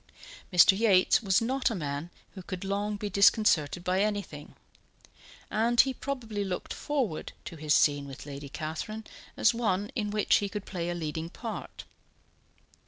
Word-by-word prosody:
Mr. 180 +1 +7
Yates 200 -2 +4
was 195 +1 +2
not 260 +3 +1
a 230 - -3
man 145 -1 -4 0.2
who 190 - -9
could 185 0 -6
long 205 +1 -1
be 205 - -4
disconcerted 185 -5 +3
by 185 +2 +1
anything; 200 -8 -3 1.0
and 230 +2 +4
he 265 0 -1
probably 230 -7 -4
looked 185 -2 -4
forward 260 - -2
to - - -7
his 155 -1 +1
scene 145 -1 +3
with 135 0 -9
Lady 140 -1 -8
Catherine 160 +9 -5 0.3
as 220 - +4
one 205 -2 -1
in 210 -4 -1
which 210 0 +3
he 200 - -2
could 205 0 -6
play 175 -2 -4
a 175 - -2
leading 160 0 -4
part. 225 +4 -7
195 Hz, 160 wpm, -29 LUFS, 165-215 Hz, 1.0 s, Mr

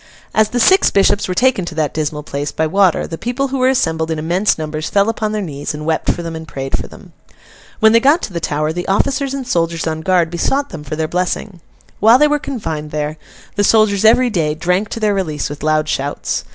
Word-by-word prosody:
As 215 -1 +3
the 245 - -1
six 380 - +5
bishops 200 +1 +2
were 185 - -2
taken 250 -3 +2
to 170 - -7
that 155 -2 -1
dismal 150 -1 -3
place, 145 0 -4
by 160 - -1
water, 185 +2 +2
the 165 - -7
people 255 +4 -2
who 270 0 -2
were 255 0 +3
assembled 160 -10 0
in 160 - -1
immense 175 +7 +1
numbers 155 0 -4
fell 200 +2 +2
upon 215 -1 -2
their 215 -1 -2
knees, 145 -3 -5
and 150 0 -7
wept 160 0 -1
for 175 - -5
them, 165 -1 -5
and 160 0 -8
prayed 135 -1 -3
for - - -5
them. - - -15 0.7
When 220 0 +6
they 230 - +5
got 285 +8 +3
to 190 - -5
the 170 - -2
Tower, 155 -1 -1
the 175 +1 -4
officers 275 +7 0
and 265 -3 -5
soldiers 165 -5 0
on 160 -1 -2
guard 175 -1 +2
besought 275 +11 0
them 160 -5 -8
for 150 +1 -5
their 160 0 -1
blessing. 180 +1 -3 0.4
While 225 +4 +6
they 300 +2 +4
were 295 0 +1
confined 160 - -5
there, 150 +1 -3 0.4
the 205 - +1
soldiers 215 -2 +3
every 240 +3 +5
day 155 -6 0
drank 180 +6 0
to - - -5
their 210 -2 +1
release 155 -8 -2
with 145 - -8
loud 155 0 +1
shouts. 140 -1 -2
175 Hz, 235 wpm, -17 LUFS, 155-220 Hz, 0.7 s, When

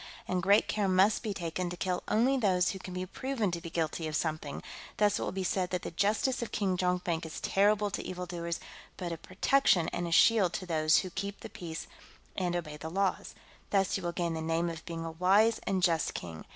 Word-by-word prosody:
And 185 0 0
great 200 +4 +4
care 205 -2 0
must 190 +3 +4
be 220 - -3
taken 175 -1 -3
to 175 - -6
kill 180 0 -1
only 245 +5 +3
those 185 -7 +2
who 190 - -7
can 185 -1 -8
be 185 0 -2
proven 230 0 -2
to 170 0 -3
be 170 - -7
guilty 160 0 -2
of 155 - -3
something; 155 -2 -2 0.3
thus 205 -1 +3
it - - -4
will - - -2
be 190 0 -3
said 185 0 0
that 180 -1 -2
the - - -4
justice 215 - +1
of 235 - -4
King 195 -3 0
Jonkvank 180 -2 0
is 160 -1 -6
terrible 205 +1 +2
to - - -2
evildoers 175 -2 -4 0.4
but 175 -2 -4
a 165 - -3
protection 185 - +2
and 175 - -3
a - - -5
shield 195 0 +5
to 185 - -3
those 155 -2 +3
who 185 - -1
keep 200 +3 -5
the - - -7
peace 165 -2 -6 0.5
and 180 -2 -1
obey 155 -4 -4
the 160 +2 -6
laws. 195 +2 -1 0.3
Thus 195 -2 +2
you 195 - -2
will 175 -1 -2
gain 170 -1 -1
the 160 - -3
name 165 +1 0
of 160 -1 -8
being 165 -1 -4
a 165 - -4
wise 195 +7 +4
and 190 -2 0
just 165 -3 +2
king. 80 -2 -7
180 Hz, 230 wpm, -31 LUFS, 170-200 Hz, 0.5 s, shield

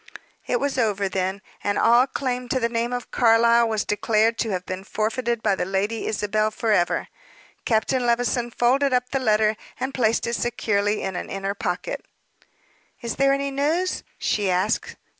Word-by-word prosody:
It 245 - +1
was 275 -1 -1
over, 205 -4 +1
then, 190 +1 -2 0.2
and 205 0 0
all 240 +3 +5
claim 250 -2 -3
to 260 - +1
the 235 - +1
name 235 +1 -2
of 245 -1 -4
Carlyle 235 0 +4
was 215 -1 -1
declared 220 +2 +1
to 225 - 0
have 185 -2 -3
been 185 +1 -5
forfeited 225 +3 -2
by 205 - +3
the 190 - -1
Lady 195 +4 -1
Isabel 215 0 0
forever. 215 -5 0 0.6
Captain 245 +3 +1
Levison 240 0 +1
folded 260 +4 +2
up 250 0 +1
the 270 - 0
letter, 215 -3 +2 0.2
and 265 +1 -3
placed 230 -3 +1
it 235 - -2
securely 210 -3 0
in 190 -1 -3
an - - -5
inner 195 0 -3
pocket. 200 - -3 1.0
"Is 235 -2 -4
there 275 0 +4
any 275 0 0
news?" 315 +7 0
she 205 -2 0
asked. 180 0 0
230 Hz, 170 wpm, -23 LUFS, 205-245 Hz, 1.0 s, all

